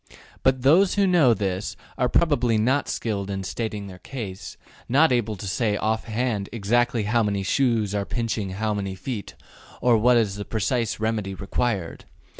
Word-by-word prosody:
'' - - -25
But 130 -1 +2
those 175 +8 +5
who 200 -1 +3
know 165 -11 +5
this 95 -1 -3 0.2
are 125 - +1
probably 125 -9 +2
not 130 +7 +1
skilled 100 -4 -2
in 95 -1 -3
stating 105 +1 -4
their 95 -2 -10
case, 105 -8 -7 0.3
not 145 +5 +4
able 115 -3 +1
to 100 - -8
say 105 +1 0
off 110 +1 -1
hand 110 -3 -2
exactly 115 +1 +1
how 115 +3 +2
many 100 -2 0
shoes 110 -2 +1
are 100 -1 0
pinching 110 -2 -2
how 110 +2 -1
many 100 -2 -3
feet, 105 +1 -6 0.4
or 120 -3 +4
what 120 +2 +5
is 105 -4 +1
the 100 - -4
precise 115 +2 -1
remedy 110 -3 -2
required. 100 -2 -2
110 Hz, 175 wpm, -24 LUFS, 100-125 Hz, 0.4 s, those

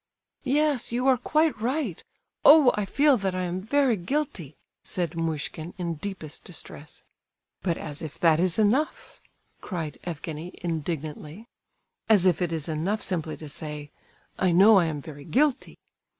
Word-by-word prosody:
"Yes, 290 -3 +2
you 245 +2 -1
are 265 - +6
quite 305 -6 +1
right. 250 - -2 0.4
Oh! 290 -3 +8
I 210 - -1
feel 280 +6 +3
that 190 -3 -2
I 185 - -1
am 180 +1 -3
very 265 +3 +2
guilty!" 180 - -3 0.3
said 175 -3 -2
Muishkin, 160 0 -4
in 170 -2 -2
deepest 160 -2 -7
distress. 160 -4 -9 0.6
"But 170 -3 -1
as 150 -2 -6
if 155 -3 -7
that 165 -2 +4
is 180 -1 +2
enough!" 230 +8 0 0.4
cried 165 -6 -5
Evgenie, 165 0 -6
indignantly. 160 +2 -4 0.6
"As 205 -5 +5
if 180 -3 +3
it 175 -2 0
is 160 -2 -2
enough 170 +7 -1
simply 160 -4 -2
to 155 - -9
say: 150 0 -7 0.5
'I 185 -2 +3
know 200 +3 +7
I 175 - +2
am 150 -3 -4
very 145 -2 -10
guilty! 280 - 0
180 Hz, 150 wpm, -26 LUFS, 160-225 Hz, 0.6 s, Oh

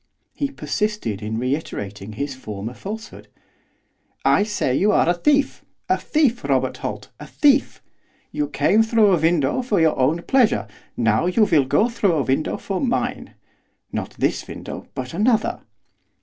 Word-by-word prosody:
He 280 - -2
persisted 210 - -2
in 110 +1 -3
reiterating 110 -6 -4
his 140 +6 -3
former 110 -2 -6
falsehood. 220 - -8 1.0
'I - - +4
say 205 -11 0
you 205 +8 +3
are - - +3
a 175 - +4
thief! 280 +11 +1 0.3
a - - +3
thief, 265 -6 +1
Robert - - 0
Holt, - - -6
a - - -9
thief! 285 -2 +2 0.5
You 295 0 -1
came 215 +3 +3
through 225 -3 +4
a 170 - +2
window 160 - +2
for 225 -6 0
your 160 -1 +3
own 155 +7 +1
pleasure, 215 - +2 0.3
now 115 +7 +2
you 200 +5 +3
will 155 -9 +3
go 210 - +3
through 220 -6 +1
a 150 -4 +1
window 135 +4 0
for 195 -2 -4
mine, 250 -2 -2 0.6
not - - -5
this - - -1
window, - - -8
but - - -5
another. 215 +5 +1
180 Hz, 155 wpm, -22 LUFS, -, 1.0 s, I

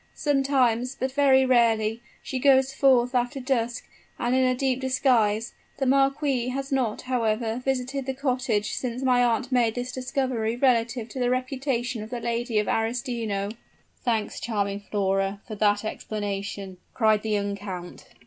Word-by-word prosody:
Sometimes 270 -3 +1
but 260 +1 -2
very 265 -1 +4
rarely 230 -3 +2 0.2
she 260 - -3
goes 265 0 +4
forth 255 -3 +3
after 245 +2 0
dusk, 245 -2 -1 0.3
and 240 +1 0
in 260 0 +3
a 255 0 +2
deep 260 0 0
disguise; 235 -4 +2 0.2
the 270 - -1
marquis 275 -1 +2
has 270 +2 -4
not, 255 -5 0
however, 230 -1 -1
visited 265 +1 -2
the 265 - -2
cottage 250 -6 -1
since 250 0 -3
my 250 -1 +4
aunt 240 +2 0
made 235 -3 +2
this 245 0 -3
discovery 255 -3 -1
relative 240 -2 +1
to 260 - -7
the 245 -1 +1
reputation 255 -2 -1
of 215 - -7
the 245 0 -4
Lady 235 0 -2
of 210 - +1
Arestino." 225 -3 -1 0.5
"Thanks, 225 -4 -1
charming 200 -3 -2
Flora, 195 -1 0
for 220 - -7
that 205 0 +1
explanation!" 200 -3 -4 0.2
cried 215 -3 +3
the 220 - -4
young 200 -1 0
count. 185 -3 -8
245 Hz, 155 wpm, -25 LUFS, 220-260 Hz, 0.5 s, very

